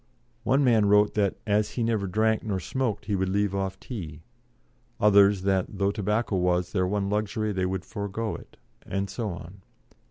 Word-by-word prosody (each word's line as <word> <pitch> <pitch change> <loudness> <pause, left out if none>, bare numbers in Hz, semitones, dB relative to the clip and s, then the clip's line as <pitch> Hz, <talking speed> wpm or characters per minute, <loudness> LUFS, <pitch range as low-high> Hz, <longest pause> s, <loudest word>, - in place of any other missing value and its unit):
One 135 +2 +3
man 115 -5 +4
wrote 105 +1 +4
that 100 -3 +1
as 105 0 +1
he 120 - -1
never 110 -4 0
drank 110 +3 +1
nor 100 -4 -2
smoked 120 +2 -2
he 105 - 0
would 95 0 0
leave 100 0 +1
off 95 -1 -2
tea; 80 - -7 0.8
others 100 -2 +5
that 95 -2 +1
though 100 0 +2
tobacco 105 0 -1
was 90 0 +1
their 90 -3 +1
one 100 +1 -1
luxury, 105 +1 -1
they 95 -2 0
would 95 0 -3
forego 105 +2 -4
it; - - -13 0.3
and 100 0 -3
so 110 0 -3
on. 90 +2 -9
100 Hz, 180 wpm, -26 LUFS, 95-110 Hz, 0.8 s, others